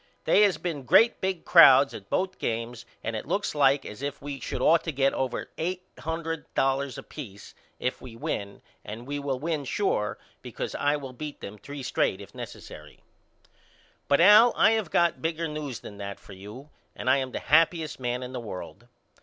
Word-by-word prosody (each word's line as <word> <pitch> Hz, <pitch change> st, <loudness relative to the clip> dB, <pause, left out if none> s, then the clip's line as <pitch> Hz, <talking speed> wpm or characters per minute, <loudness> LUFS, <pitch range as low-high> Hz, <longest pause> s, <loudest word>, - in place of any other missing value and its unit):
They -, -, +4 dB
has 205 Hz, -3 st, +4 dB
been 165 Hz, -5 st, -4 dB
great 220 Hz, -, +4 dB
big 190 Hz, -3 st, -2 dB
crowds 165 Hz, -5 st, +7 dB
at 100 Hz, -1 st, -10 dB
both 190 Hz, 0 st, -1 dB
games 115 Hz, +1 st, -4 dB, 0.2 s
and 115 Hz, 0 st, -3 dB
it 110 Hz, -, -5 dB
looks 200 Hz, -, -1 dB
like 140 Hz, -2 st, +3 dB
as 105 Hz, -, -9 dB
if 140 Hz, 0 st, -4 dB
we 140 Hz, -1 st, -6 dB
should -, -, -4 dB
ought 165 Hz, +1 st, +4 dB
to 165 Hz, -, -1 dB
get 135 Hz, -1 st, +1 dB
over 130 Hz, -2 st, -3 dB
eight 180 Hz, +3 st, -2 dB, 0.2 s
hundred 165 Hz, 0 st, -4 dB
dollars 135 Hz, -1 st, 0 dB
a -, -, -7 dB
peace 105 Hz, -10 st, -10 dB, 0.3 s
if 125 Hz, -, -2 dB
we 125 Hz, -3 st, -10 dB
win 100 Hz, -3 st, -5 dB, 0.2 s
and 110 Hz, +3 st, -8 dB
we 145 Hz, +2 st, -4 dB
will 140 Hz, -2 st, -2 dB
win 155 Hz, +1 st, -2 dB
sure 130 Hz, -, -1 dB, 0.2 s
because -, -, -5 dB
I 145 Hz, +1 st, +1 dB
will 135 Hz, -3 st, -7 dB
beat 150 Hz, +3 st, -7 dB
them 105 Hz, +1 st, -9 dB
three 140 Hz, +6 st, -8 dB
straight -, -, 0 dB
if -, -, -12 dB
necessary. -, -, -10 dB, 1.1 s
But 140 Hz, +2 st, +4 dB
Al 210 Hz, +6 st, +8 dB
I 215 Hz, -, +6 dB
have 220 Hz, -6 st, 0 dB
got 170 Hz, -1 st, +2 dB
bigger 165 Hz, 0 st, -2 dB
news 150 Hz, -5 st, -5 dB
than 100 Hz, -, -10 dB
that 100 Hz, 0 st, -6 dB
for 100 Hz, -, -13 dB
you 105 Hz, +10 st, -11 dB, 0.2 s
and -, -, -7 dB
I 130 Hz, +2 st, +5 dB
am 130 Hz, -1 st, -3 dB
the -, -, -4 dB
happyest 160 Hz, -1 st, +2 dB
man 125 Hz, 0 st, -2 dB
in 125 Hz, +1 st, -7 dB
the 125 Hz, -, -4 dB
world. 115 Hz, +2 st, -8 dB
140 Hz, 195 wpm, -27 LUFS, 125-165 Hz, 1.1 s, Al